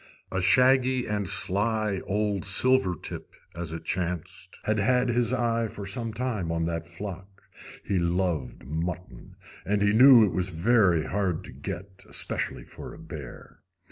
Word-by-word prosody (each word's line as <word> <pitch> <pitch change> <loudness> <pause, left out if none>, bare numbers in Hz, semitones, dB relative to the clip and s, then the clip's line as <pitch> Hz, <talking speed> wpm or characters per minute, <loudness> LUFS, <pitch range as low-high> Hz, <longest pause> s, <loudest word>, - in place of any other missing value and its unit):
A 95 - -1
shaggy 130 +3 +4
and 105 -2 -2
sly 105 0 +1
old 105 -1 0
"silver 105 0 +3
tip," - - -7 0.2
as 85 -1 -5
it 80 - -6
chanced, 90 0 -3
had 110 0 0
had 125 +4 +2
his 120 -1 +1
eye 115 -2 0
for 105 -1 -8
some 115 +4 -3
time 110 -8 -3
on 85 0 -1
that 85 0 -3
flock. 95 +2 -9 0.4
He 100 -2 0
loved 85 -7 -1
mutton, 80 -2 -5 0.3
and 100 +1 0
he 105 0 +3
knew 125 -1 +8
it 100 - -1
was 90 +1 -1
very 90 -1 +3
hard 95 -4 -1
to - - -10
get, 95 0 -8
especially - - -3
for - - -10
a - - -13
bear. - - -10
100 Hz, 155 wpm, -27 LUFS, 90-115 Hz, 0.4 s, knew